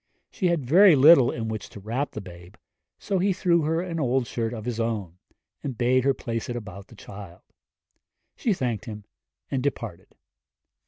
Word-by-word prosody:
She 185 - -1
had 170 -6 0
very 180 +6 +7
little 140 -1 +7
in 115 -1 -4
which 110 -1 -5
to - - -11
wrap 120 +8 -3
the 110 - -5
babe, 90 0 -13 0.4
so 195 -2 -2
he 195 +2 +2
threw 175 -2 +2
her 160 +2 0
an 170 -2 -4
old 130 -2 +1
shirt 115 -1 -3
of 110 -3 -7
his 120 -2 -3
own, 105 -7 -3 0.4
and 135 -5 -5
bade 125 +2 +2
her 135 - +4
place 115 -2 -4
it 120 - -3
about 105 -4 -8
the 115 - -16
child. 95 -4 -11 0.9
She 230 - -1
thanked 125 - -2
him 105 -3 -8 0.5
and 135 -2 0
departed. 115 -9 -5
120 Hz, 180 wpm, -25 LUFS, 110-150 Hz, 0.9 s, very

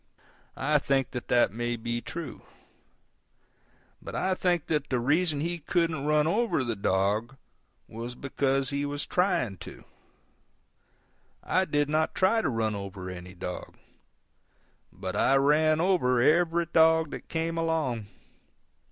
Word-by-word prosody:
I 150 +2 +2
think 135 -2 0
that 125 - -6
that 120 -5 +3
may 120 +2 -2
be 120 +1 -3
true: 160 -2 -7 1.6
but - - -8
I 185 +1 +1
think 175 -3 0
that 150 -2 -1
the 125 - +1
reason 150 +4 +1
he 170 +2 -2
couldn't 160 -2 0
run 150 0 +3
over 210 - +1
the 120 -2 -2
dog 100 +6 0 0.5
was 115 +2 -7
because 135 0 -1
he 140 0 -1
was 145 +1 -3
trying 175 - 0
to. - - -11 1.6
I 185 +1 +1
did 145 -3 +1
not 155 +1 0
try 210 +5 +3
to - - 0
run 110 -3 0
over 100 -2 -6
any 90 +1 -9
dog. 90 0 -7 1.1
But 95 +1 -6
I 135 - +3
ran 155 +3 +3
over 165 -9 +2
every 170 +5 +3
dog 160 -1 +4
that - - -8
came 165 0 -2
along. 155 -10 -1
145 Hz, 135 wpm, -28 LUFS, 120-165 Hz, 1.6 s, dog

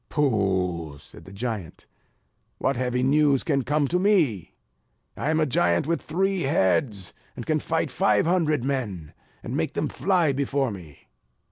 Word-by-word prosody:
"Pooh!" 95 - 0
said - - -15
the 95 - -12
giant, 105 -4 -5 0.7
"what 135 - 0
heavy 125 0 -1
news 140 0 +3
can 140 -4 +1
come 145 +2 +1
to 180 +5 0
me? 170 - +1 0.6
I 145 - -2
am 160 0 +2
a 155 - +3
giant 85 - +1
with 165 +2 -1
three 190 +3 0
heads; 100 - +1 0.2
and - - -7
can - - +1
fight - - -1
five 105 +4 +2
hundred 160 -6 +1
men, 110 - -3 0.3
and - - -4
make - - -1
them - - -1
fly 180 -5 +1
before 135 -1 0
me." 85 -7 -12
130 Hz, 155 wpm, -25 LUFS, 95-155 Hz, 0.7 s, news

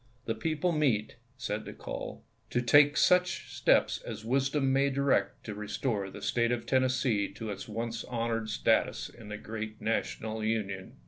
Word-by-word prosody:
The 115 - 0
people 155 +8 0
meet," 125 -9 +1 0.2
said 110 -4 -3
the - - -7
call, - - -6
" - - -39
to 120 - +1
take 145 +4 +6
such 180 0 +3
steps - - +3
as 110 -1 -7
wisdom 135 +2 +2
may 140 +1 +3
direct 140 0 +1
to 110 - -5
restore 105 0 -2
the - - -10
State 115 0 +2
of 120 -2 -1
Tennessee 130 -5 +2
to 110 -2 -5
its 100 - -6
once 115 +1 -3
honored 115 -2 -2
status 105 - +1
in 115 -3 -13
the 105 - -4
gi 110 +1 -7
eat 110 0 -7
National 110 0 -2
Union. 100 -4 -2
115 Hz, 175 wpm, -30 LUFS, 110-135 Hz, 0.2 s, take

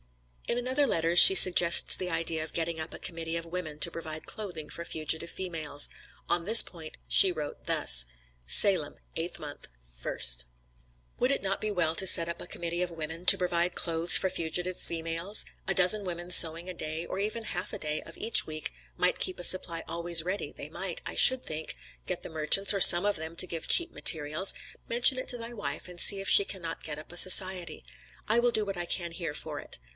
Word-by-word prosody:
In 235 - -4
another 260 +4 -3
letter, 165 -6 -3
she 185 - +11
suggests 175 -2 +7
the 180 - -7
idea 165 -2 -4
of 160 - -12
getting 165 0 -6
up 155 - -11
a - - -12
committee 165 0 -7
of 165 - -9
women 165 -3 -9
to 170 - 0
provide 155 -1 -11
clothing 180 -8 -10
for 170 - -11
fugitive 160 0 -5
females; 160 -6 -4 0.4
on 175 - -3
this 220 +5 +8
point 160 -3 -12
she 190 - +5
wrote 150 -4 -10
thus: - - +1 0.4
"SALEM, - - +2 0.2
8th - - -7
mo., - - -11 0.5
1st. - - -1 0.7
"Would 250 +2 -1
it 275 - -3
not 195 0 -4
be 215 - -5
well 165 -4 -3
to 190 - +3
get 170 -2 +6
up 170 - -8
a - - -11
committee 170 0 -6
of 180 -1 -5
women, 165 +1 -9
to - - +6
provide 175 0 -4
clothes 165 0 +3
for 190 - -3
fugitive 175 +2 -5
females 165 +4 -2 0.2
a - - 0
dozen 190 +3 +3
women 175 -1 -8
sewing 165 0 +4
a 185 - -8
day, 160 0 -7
or 185 - -9
even 215 +3 -6
half 185 -2 -7
a - - -9
day 150 0 -5
of 165 - -16
each 225 - -1
week, 155 - -7 0.2
might - - -2
keep 185 - -2
a - - -9
supply 175 -3 0
always 170 0 +1
ready, 185 +4 -7
they - - -10
might, - - -5
I - - -7
should 260 -1 +3
think, 155 0 -6 0.3
get 180 - -6
the - - -10
merchants 160 +6 +3
or 195 - -4
some 175 +2 +9
of 205 - -2
them, 160 +1 -9
to 185 - +1
give 165 -2 -8
cheap 345 -1 +3
materials 155 +3 +2 0.4
mention 245 +3 +3
it - - -9
to 245 - 0
thy 230 0 -9
wife, 210 -4 -8
and 180 -1 -12
see 200 +2 +3
if 195 - -8
she - - +6
cannot 175 -4 -9
get 150 -2 -6
up 155 - -15
a - - -11
society. 185 -3 +5 0.4
I 220 +2 0
will 240 0 -1
do 215 -2 -3
what 195 -1 -7
I 175 0 -7
can 170 0 -5
here 165 -4 -8
for 150 -2 -8
it. - - -9
170 Hz, 215 wpm, -25 LUFS, 160-190 Hz, 0.7 s, she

